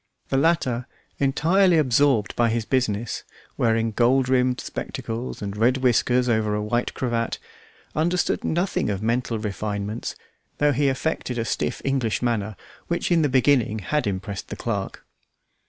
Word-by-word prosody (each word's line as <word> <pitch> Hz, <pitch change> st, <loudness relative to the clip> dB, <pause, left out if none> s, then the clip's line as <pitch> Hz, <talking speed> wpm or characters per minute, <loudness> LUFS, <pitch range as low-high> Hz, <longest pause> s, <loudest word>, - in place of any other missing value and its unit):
The 135 Hz, -, +1 dB
latter, 135 Hz, -5 st, +1 dB, 0.3 s
entirely 165 Hz, +6 st, +3 dB
absorbed 130 Hz, -6 st, +3 dB
by 120 Hz, -1 st, +3 dB
his 115 Hz, 0 st, -1 dB
business, 120 Hz, -4 st, -1 dB, 0.3 s
wearing 115 Hz, -1 st, +1 dB
gold 125 Hz, +3 st, +3 dB
rimmed 125 Hz, -1 st, +2 dB
spectacles 120 Hz, -2 st, -5 dB
and 100 Hz, 0 st, -4 dB
red 120 Hz, +5 st, +3 dB
whiskers 125 Hz, 0 st, +2 dB
over 110 Hz, -3 st, +1 dB
a 105 Hz, -, -1 dB
white 120 Hz, +3 st, -1 dB
cravat, 120 Hz, -2 st, -1 dB, 0.6 s
understood 175 Hz, +3 st, +1 dB
nothing 175 Hz, -, 0 dB
of 100 Hz, 0 st, -2 dB
mental 115 Hz, 0 st, 0 dB
refinements, 105 Hz, 0 st, -4 dB, 0.4 s
although 145 Hz, 0 st, +4 dB
he 140 Hz, +2 st, +2 dB
affected 130 Hz, -2 st, -2 dB
a 115 Hz, -, -1 dB
stiff -, -, -2 dB
English 130 Hz, -5 st, 0 dB
manner, 110 Hz, -3 st, -1 dB, 0.3 s
which 170 Hz, +1 st, -1 dB
in 170 Hz, -2 st, +4 dB
the 150 Hz, -, +2 dB
beginning 125 Hz, -4 st, +3 dB
had 145 Hz, +6 st, -1 dB
impressed 100 Hz, 0 st, -4 dB
the -, -, -6 dB
clerk. -, -, -4 dB
120 Hz, 145 wpm, -24 LUFS, 110-135 Hz, 0.6 s, although